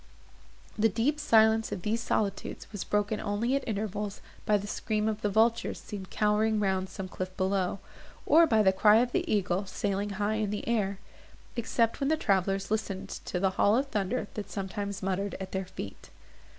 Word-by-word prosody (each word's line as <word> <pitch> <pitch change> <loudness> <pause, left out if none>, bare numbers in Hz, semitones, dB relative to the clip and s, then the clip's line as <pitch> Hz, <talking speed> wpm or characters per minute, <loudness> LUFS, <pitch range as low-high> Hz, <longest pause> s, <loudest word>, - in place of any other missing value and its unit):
The 225 +1 +5
deep 245 +9 0
silence 220 -4 +4
of 180 - -4
these 225 +2 0
solitudes 200 -3 -2
was 205 -3 -4
broken 210 +1 0
only 220 +5 0
at 275 - -2
intervals 210 -1 -3 0.3
by 210 - +5
the 200 - -6
scream 215 +1 -1
of 215 -1 -2
the 205 - +1
vultures, 225 +3 +2
seen 195 -3 -7
cowering 215 +2 +2
round 190 -2 0
some 195 -2 -6
cliff 185 0 -6
below, 190 -1 0 0.5
or 330 +1 +6
by 220 -5 +4
the 190 -1 +5
cry 210 +2 +6
of 240 +2 +3
the 355 +2 -1
eagle 195 -1 +1
sailing 200 +1 -2
high 210 +1 0
in 210 - 0
the 210 0 -4
air; 205 -4 0 0.6
except 230 -1 0
when 275 0 +1
the 315 - +3
travellers 195 - 0
listened 215 -3 -2 0.2
to 180 - -2
the 190 0 +2
hollow 220 +6 +4
thunder 215 -3 -2
that 210 - -6
sometimes 200 0 -4
muttered 195 +1 -1
at 190 - -6
their 190 0 -2
feet. 100 - -8
210 Hz, 180 wpm, -29 LUFS, 195-220 Hz, 0.6 s, or